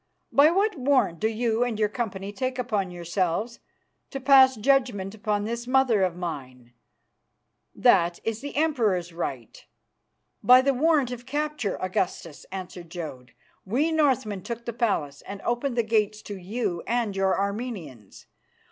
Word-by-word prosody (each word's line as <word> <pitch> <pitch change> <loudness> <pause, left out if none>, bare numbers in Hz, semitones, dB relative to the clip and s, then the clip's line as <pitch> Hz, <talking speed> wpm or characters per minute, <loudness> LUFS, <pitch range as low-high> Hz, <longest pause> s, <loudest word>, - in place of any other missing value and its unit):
By 285 +2 +6
what 390 +2 +1
warrant 255 - +2
do 220 - +1
you 225 +1 0
and 240 -3 -2
your 215 -1 +2
company 205 -3 -4
take 255 +3 -3
upon 215 -7 -1
yourselves 180 +5 -2 0.5
to 270 - -5
pass 265 -1 +6
judgment 220 -5 +1
upon 210 -1 -1
this 235 +2 -4
mother 255 -5 +3
of 180 -2 +1
mine? 130 -8 -7 1.0
That 170 0 +3
is 225 0 -3
the 285 +1 -7
Emperor's 220 - +1
right." 135 -9 -5 0.8
"By 250 +4 +7
the 275 +1 +2
warrant 290 -2 +2
of 245 0 -8
capture, 295 -6 -2
Augustus," 185 -4 -3
answered 180 -2 -7
Jodd. 150 -8 -8 0.3
"We 270 +11 0
Northmen 265 -10 +1
took 235 +3 -6
the 235 - -4
palace 155 - -1
and 200 0 -8
opened 240 +1 -1
the 235 - +3
gates 215 -1 0
to 205 - -6
you 190 -1 -3
and 230 -3 0
your 195 -1 +1
Armenians. 200 - -5
220 Hz, 145 wpm, -26 LUFS, 185-255 Hz, 1.0 s, By